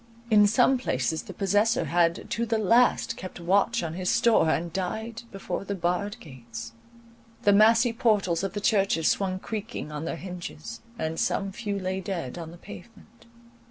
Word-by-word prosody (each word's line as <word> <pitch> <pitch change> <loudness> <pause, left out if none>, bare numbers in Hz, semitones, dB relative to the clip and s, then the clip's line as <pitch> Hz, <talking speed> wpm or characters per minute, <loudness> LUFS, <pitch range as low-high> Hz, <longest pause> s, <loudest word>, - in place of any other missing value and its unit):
In 210 -1 +7
some 245 +4 +3
places 145 - -1
the - - -10
possessor 205 +5 +2
had 170 0 +1
to 235 - 0
the 225 -1 0
last 230 +4 +3
kept 185 -1 -8
watch 195 +5 +2
on 160 -1 -3
his 180 +1 -2
store, 225 -8 +4
and 165 +1 -1
died 220 +5 -4
before 195 0 -4
the 200 0 -4
barred 180 +3 -2
gates. 115 -5 -9 0.7
The 205 - +5
massy 225 +3 +5
portals 210 -8 +1
of 195 - -2
the 205 - -4
churches 195 -7 +2
swung 190 -2 +1
creaking 215 -5 -6
on 150 +1 -5
their 170 - -3
hinges; 180 +3 -8 0.2
and 160 +1 -3
some 195 -1 0
few 205 -1 -4
lay 190 0 -2
dead 175 -6 -4
on 165 -1 -7
the 170 - -12
pavement. 230 +5 -14
195 Hz, 170 wpm, -26 LUFS, 170-220 Hz, 0.7 s, In